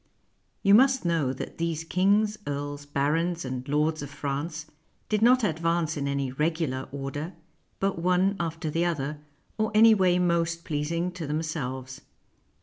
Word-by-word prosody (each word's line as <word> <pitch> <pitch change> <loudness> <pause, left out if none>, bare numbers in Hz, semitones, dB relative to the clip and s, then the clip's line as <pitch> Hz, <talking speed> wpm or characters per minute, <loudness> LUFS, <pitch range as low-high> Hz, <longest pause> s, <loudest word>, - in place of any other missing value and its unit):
You 200 -1 +5
must 260 +1 +5
know 165 -6 +1
that 130 - -7
these 165 -1 -1
kings, 200 +5 +2
earls, 145 0 -4
barons, 160 +4 0
and 130 0 -5
lords 150 +2 +1
of 145 - -6
France 145 +3 -4 0.4
did 215 -1 +1
not 250 +2 +5
advance 165 -3 0
in 140 -2 -2
any 140 -2 -1
regular 150 -2 -1
order, 140 +5 -5 0.5
but 195 -3 0
one 180 +3 +2
after 165 -1 -3
the 165 +3 +1
other, 150 -3 -2 0.4
or 215 - +2
any 225 +1 +8
way 185 -3 +3
most 170 -1 0
pleasing 165 +4 -1
to 175 -4 -6
them 155 +2 -1
selves. 130 -4 -5
165 Hz, 150 wpm, -27 LUFS, 145-180 Hz, 0.5 s, any